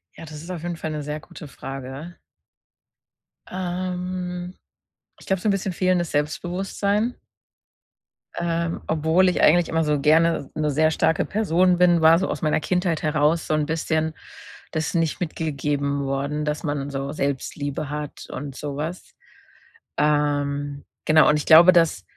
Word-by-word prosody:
Ja, - - -10
das 155 -1 -9
ist 170 - -11
auf 175 -3 -5
jeden 175 0 -3
Fall 160 - -4
'ne 150 -1 -3
sehr 150 +1 -4
gute 170 -1 -12
Frage. 135 +5 -8 1.3
Ähm, 180 0 -4 0.6
ich - - -15
glaube, 190 -2 0
so - - -1
'n - - +4
bisschen 195 -1 -2
fehlendes 180 -1 +1
Selbstbewusstsein. 195 +9 -1 1.2
Ähm, 170 0 -2
obwohl 160 +4 +3
ich 180 - 0
eigentlich 170 +2 +5
immer 165 0 +1
so 150 -1 +1
gerne 160 0 +3
'ne 155 -1 0
sehr 155 +3 +3
starke 160 0 +1
Person 185 -4 +2
bin, 175 -1 +4
war 160 +1 +7
so 190 - -1
aus - - -4
meiner 155 -1 +1
Kindheit 180 -1 -1
heraus, 155 +1 +2
so - - 0
'n 155 -1 +1
bisschen 160 0 -1 0.6
das 155 +2 -2
nicht 165 0 0
mitgegeben 145 -4 -2
worden, 140 +2 -2
dass 150 0 -2
man 145 -2 -2
so 135 0 -4
Selbstliebe 145 0 -3
hat 150 -1 -6
und 140 0 -6
so 145 0 -5
was. 160 +5 -6 0.8
Ähm, 145 -1 0 0.2
genau, 155 0 +6
und 150 - +4
ich 150 - -4
glaube, 170 +3 +9
dass 170 -3 +2
160 Hz, 155 wpm, -23 LUFS, 150-175 Hz, 1.3 s, glaube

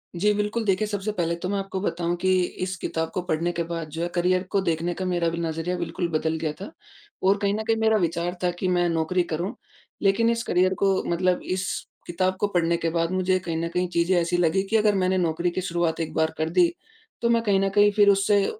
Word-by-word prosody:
जी। 210 +4 +2
बिल्कुल, 210 +3 -1
देखिए 195 +1 +1
सबसे 205 0 -2
पहले 170 -4 -1
तो 175 +2 -5
मैं 200 - 0
आपको 195 -1 -4
बताऊँ 175 -2 -1
कि 185 - +2 0.3
इस 185 0 -2
किताब 160 -1 -3
को 185 - -1
पढ़ने 175 -1 -1
के 170 -1 -2
बाद, 165 -1 -5
जो 160 +2 -5
है 170 - 0
करियर 180 +1 +2
को 200 - +2
देखने 170 -1 -1
का 185 - -4
मेरा 175 -2 +1
भी 165 - -4
नज़रिया 165 +2 -2
बिल्कुल 175 0 -2
बदल 160 0 0
गया 155 -2 -1
था 200 - -7 0.5
और 195 +2 +4
कहीं 200 0 +1
न 215 +1 -2
कहीं 225 - +3
मेरा 220 0 +4
विचार 175 -1 -1
था 180 - +2
कि 185 - -1
मैं 175 -1 +2
नौकरी 165 +2 +1
करूँ, 180 +9 -3 0.5
लेकिन 205 +4 +3
इस 230 0 0
करियर 185 -1 +2
को 195 -1 +3
मतलब, 180 +1 +1
इस 185 0 -2 0.4
किताब 185 +2 0
को 205 - +2
पढ़ने 170 -3 +1
के 165 - -1
बाद 165 +1 0
मुझे 185 0 +1
कहीं 170 -2 -4
न 165 +1 -1
कहीं 180 +1 -1
चीज़ें 170 +1 +1
ऐसी 170 +1 0
लगी 175 +2 +2
कि 225 - +1
अगर 210 -1 +3
मैंने 185 0 +1
नौकरी 170 0 0
की 185 - -2
शुरुआत 170 -3 -1
एक 165 - -3
बार 160 0 +1
कर 155 +1 -1
दी, 175 0 +3 0.5
तो 235 - +2
मैं 230 -1 +3
कहीं 200 -3 +2
न 195 0 +1
कहीं 205 +1 +4
फ़िर 205 0 +5
उससे 200 0 +3
180 Hz, 240 wpm, -25 LUFS, 170-195 Hz, 0.5 s, फ़िर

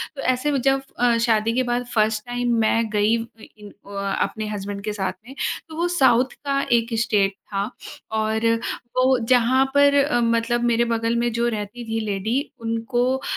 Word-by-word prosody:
तो 275 - -5
ऐसे 255 +3 +1
में 275 - +1
जब 270 +1 +2 0.2
अ, 240 -1 +3
शादी 230 -1 +2
के 255 - +2
बाद 245 0 0
फ़र्स्ट 215 0 +1
टाइम 245 0 -1
मैं 225 0 +2
गई 210 +2 +2
व 225 - -4 0.3
इन 210 -1 -11 0.2
अ, 200 0 -3
अपने 215 -1 -2
हसबैंड 200 -1 -5
के 210 0 -3
साथ 195 -2 -2
में, 270 - -11 0.3
तो 315 - -9
वो 340 +2 0
साउथ 260 -7 +3
का 275 0 +1
एक 230 0 +2
स्टेट 205 -4 +1 0.2
था। 200 +3 -1 0.4
और 220 +1 0 0.5
वो 255 0 +4
जहाँ 255 +1 +4
पर 285 0 +5
अ, 275 -4 +1
मतलब 230 +1 +1
मेरे 235 0 +2
बगल 230 0 0
में 235 0 +1
जो 235 +1 +1
रहती 220 +1 -4
थी 225 0 -1
लेडी, 210 +5 -1 0.2
उनको 240 +3 -1
230 Hz, 185 wpm, -22 LUFS, 215-250 Hz, 0.5 s, पर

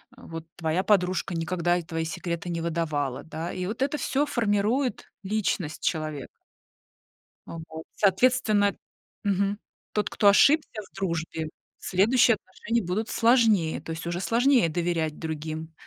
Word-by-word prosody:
э, - - -17
вот 165 0 -8
твоя 165 +2 0
подружка 185 -2 +1
никогда 175 +1 0
и - - -2
твои 165 0 -3
секреты 170 +1 -4
не 170 -1 -2
выдавала, 155 -6 -2
да, 160 +2 -5
и 180 - -4
вот 225 +6 -5
это 285 +2 +1
всё 285 +1 0
формирует 235 +2 0 0.2
личность 190 -6 -2
человека. 155 -4 -2 1.2
А 165 - -7
вот. 160 0 -7
Соответственно 210 0 +3 0.5
мгм, 200 +1 0 0.3
тот, 210 - 0
кто 205 - +2
ошибся 280 0 +4
в - - -31
дружбе, 165 -4 -3 0.3
следующие 225 +5 +3
отношения 225 +5 -3
будут 210 +6 -2
сложнее, 225 -8 +3
то 165 - -7
есть 165 +1 -5
уже 175 +1 -2
сложнее 240 -5 +3
доверять 165 -2 -1
другим. 160 0 -5
180 Hz, 140 wpm, -26 LUFS, 165-215 Hz, 1.2 s, ошибся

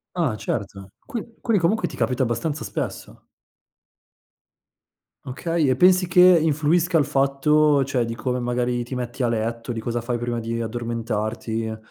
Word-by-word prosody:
Ah 160 -11 0
certo. 100 -3 -5
Qui 230 -3 -7
quindi 220 -6 +1
comunque 215 +7 +1
ti - - -9
capita 130 0 0
abbastanza 145 +6 -2
spesso? - - -6 2.0
Okay, 160 +4 -1
e 130 - +3
pensi 180 +3 +4
che 180 0 +5 0.2
influisca, 160 +3 +2
il 150 - +4
fatto 140 +2 +3
cioè 130 -3 0
di 115 0 -5
come 125 +2 -2
magari 120 0 -1
ti 130 - -6
metti 125 +1 -4
a - - +2
letto 115 +1 -2
di 115 - -4
cosa 120 +1 -2
fai 120 +1 -2
prima 120 0 -3
di 115 0 -3
addormentarti 115 -1 -3
125 Hz, 150 wpm, -23 LUFS, 115-155 Hz, 2.0 s, che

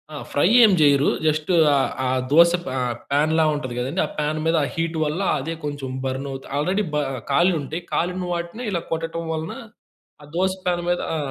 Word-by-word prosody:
ఆ! - - -5
ఫ్రై 145 - +2 0.2
ఏం 215 - +7
జెయ్యరు. 145 -2 +4 0.2
జస్టు 155 +3 +1 0.2
ఆ - - +3 0.3
ఆ - - 0 0.2
దోశ 170 +2 +7
ఫ్ - - -11
ఆ! 130 - -1 0.3
ప్యాన్‌లా 155 +3 +3
ఉంటది 130 -4 -4
కదండీ, 135 +9 -2
ఆ - - -5
ప్యాన్ 150 +1 -1
మీద 165 +1 +2
ఆ - - 0
హీట్ 165 0 -2
వల్ల 155 +6 -2 0.2
అదే 160 +5 -4
కొంచెం 145 -2 -4 0.2
బర్నువుతు 135 0 -4
ఆల్రెడీ 185 +8 +1
బ - - 0 0.4
కాలుంటయి. 165 0 +1
కాలిన 180 +2 -1
వాటిని 170 +7 -5
ఇలా 170 -2 -1
కొట్టటం 165 +1 -3
వలన 160 0 -4 0.7
ఆ 145 - -13
దోశ 185 +1 +1
ప్యాన్ 175 -1 0
మీద 175 - +1 0.2
ఆ! - - -1
160 Hz, 185 wpm, -22 LUFS, 145-170 Hz, 0.7 s, ఏం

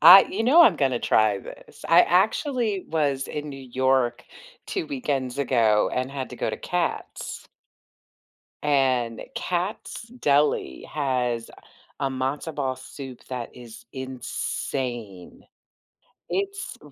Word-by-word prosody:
I 195 +2 +11
you 215 +4 -3
know, 305 +9 +7
I'm 205 - +6
gonna 130 -4 +1
try 110 -2 +3
this. - - -12
I 170 +2 +7
actually 215 - +1
was 145 -4 0
in 150 0 -5
New 135 -1 -8
York 130 -1 +1 0.4
2 375 -5 -3
weekends 140 - -2
ago 115 -6 +3
and 130 +1 -1
had 135 -2 -5
to - - -8
go - - -1
to - - -2
Katz. - - -3 1.2
And 130 -5 +2
Katz 185 +4 -3
Deli 150 - +1
has 125 -5 -1 0.5
a 135 - +1
matzo 135 +4 -3
ball 135 -3 -1
soup 130 0 -10
that 125 -2 -5
is 120 -2 -12
insane. 125 -5 -4 0.9
It's 395 0 -3
135 Hz, 120 wpm, -25 LUFS, 125-175 Hz, 1.2 s, I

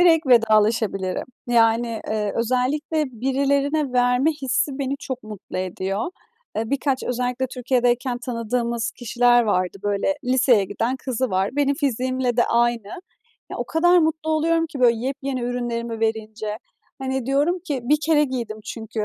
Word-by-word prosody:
direkt 330 -4 +5
vedalaşabilirim. 215 -5 +3 0.2
Yani, 230 -1 +2
iii, 210 -2 -1
özellikle 260 +7 0
"birilerine 275 +3 0
verme 250 +4 +3
hissi" 265 +2 0
beni 275 0 -2
çok 260 -2 -5
mutlu 210 -3 -7
ediyor. 190 - -2 0.5
Eee, 220 +1 -2
birkaç, 275 -1 0
özellikle 250 +1 -1
Türkiye'deyken 245 0 0
tanıdığımız 235 -1 -2
kişiler 240 0 +3
vardı, 185 -3 0
böyle, 205 +7 0
liseye 250 -4 +4
giden 225 +6 -2
kızı 260 -1 -2
var. 190 +1 +1
Benim 285 -1 +2
fiziğimle 255 -3 -1
de 240 - +3
aynı. 235 -3 +1 0.6
Ya - - -5
o - - -1
kadar 350 +2 +4
mutlu 315 -1 0
oluyorum 330 +1 +2
ki, 300 -4 -8
böyle, 240 -2 +5
yepyeni 270 -1 -3
ürünlerimi 235 -2 -3
verince. 220 -1 -2 0.4
Hani 265 -2 -3
diyorum 290 +7 +2
ki: 300 -7 -4
"Bir 295 +5 +3
kere 300 -2 +4
giydim." 240 -5 -4
çünkü. 220 -1 -4
245 Hz, 140 wpm, -22 LUFS, 225-275 Hz, 0.6 s, direkt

